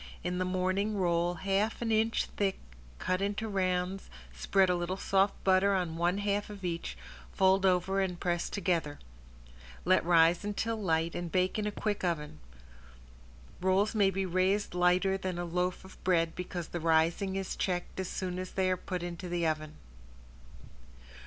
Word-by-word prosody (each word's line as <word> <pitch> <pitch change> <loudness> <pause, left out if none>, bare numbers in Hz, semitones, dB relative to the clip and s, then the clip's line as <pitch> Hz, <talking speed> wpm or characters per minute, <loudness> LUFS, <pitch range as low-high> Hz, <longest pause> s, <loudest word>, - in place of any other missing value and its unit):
In 180 +1 -2
the 185 - 0
morning 185 +3 0
roll 175 -1 +1
half 195 +5 0
an 230 -1 -1
inch 220 +1 +2
thick 195 -2 0 0.4
cut 185 - -1
into 205 +2 -1
rounds, 185 -1 -1 0.3
spread 190 - +3
a 180 - +2
little 175 +2 -2
soft 195 +1 +2
butter 195 +1 +4
on 175 -4 -1
one 175 +3 +1
half 205 0 -1
of 200 -3 -8
each, 170 -1 -3 0.3
fold 190 0 +3
over 185 +2 +2
and 180 -2 -2
press 175 -1 -1
together. 170 -6 -1 0.9
Let 185 +1 +4
rise 170 +1 +4
until 210 +2 -2
light 165 -3 +1
and 175 -1 -4
bake 185 +3 +1
in 210 - -1
a - - -1
quick 205 -1 -2
oven. 150 - -2 1.2
Rolls 190 +3 +2
may 205 -3 +4
be 195 0 -1
raised 185 +3 +1
lighter 180 +2 +2
than 185 -2 -3
a 175 - -2
loaf 180 +2 -2
of 190 - -15
bread 165 -3 +2
because 180 -2 -5
the 175 - -4
rising 165 +4 +2
is 195 -1 -3
checked 180 0 -2
as 190 - -3
soon 185 -1 -3
as 185 0 -6
they 185 -1 +1
are 185 - +1
put 180 -1 -4
into 175 +1 -5
the 175 -1 0
oven. 155 -1 -2
185 Hz, 170 wpm, -31 LUFS, 175-195 Hz, 1.2 s, butter